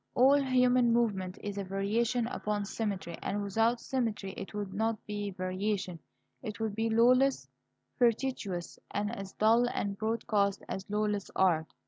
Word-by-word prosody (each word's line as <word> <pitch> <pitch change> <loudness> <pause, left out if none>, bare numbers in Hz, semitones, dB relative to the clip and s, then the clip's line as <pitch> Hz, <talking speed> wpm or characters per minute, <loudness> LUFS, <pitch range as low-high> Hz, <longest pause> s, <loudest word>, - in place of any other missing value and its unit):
All 275 +3 +6
human 250 -2 +4
movement 205 -5 0
is 205 -1 -4
a - - -2
variation 215 +5 0
upon 210 -3 -2
symmetry, 200 -5 -3
and 205 0 -2
without 225 +4 +1
symmetry 225 -8 -2
it 195 - -7
would 205 -2 -4
not 220 +2 0
be 205 -1 -3
variation; 185 -1 -2 0.4
it 215 -4 -6
would 220 -2 -1
be 225 +2 0
lawless, 250 +4 +4 0.5
fortuitous, 230 -7 0
and 210 +3 -2
as 195 -2 -7
dull 230 +3 +4
and 200 -4 -2
broadcast 215 -3 0
as 190 +1 -5
lawless 210 -1 -1
art. 165 -4 +2
210 Hz, 145 wpm, -31 LUFS, 195-235 Hz, 0.5 s, All